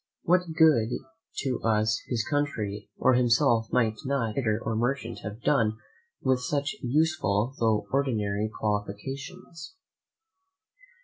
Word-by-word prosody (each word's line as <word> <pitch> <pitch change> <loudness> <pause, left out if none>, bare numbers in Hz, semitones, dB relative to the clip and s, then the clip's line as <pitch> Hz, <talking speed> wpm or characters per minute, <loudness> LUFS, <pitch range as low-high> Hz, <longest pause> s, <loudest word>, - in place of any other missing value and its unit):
What 180 0 +2
good 150 -9 +5 0.5
to 115 -5 +1 0.2
his 115 -3 -1
country 110 -9 -2
or 130 - +4
himself 115 -2 +3
might 115 -3 +2
not 130 -5 0
a - - -8
trader 110 -4 0
or 110 0 -1
merchant 120 0 -1
have 105 +2 -8
done 110 -6 +2 0.5
with 130 -1 +2
such 145 +7 -1
useful 130 -5 +1
tho' 110 -2 +2
ordinary 110 -6 0
qualifications? 135 - -5
120 Hz, 115 wpm, -27 LUFS, 110-140 Hz, 0.5 s, good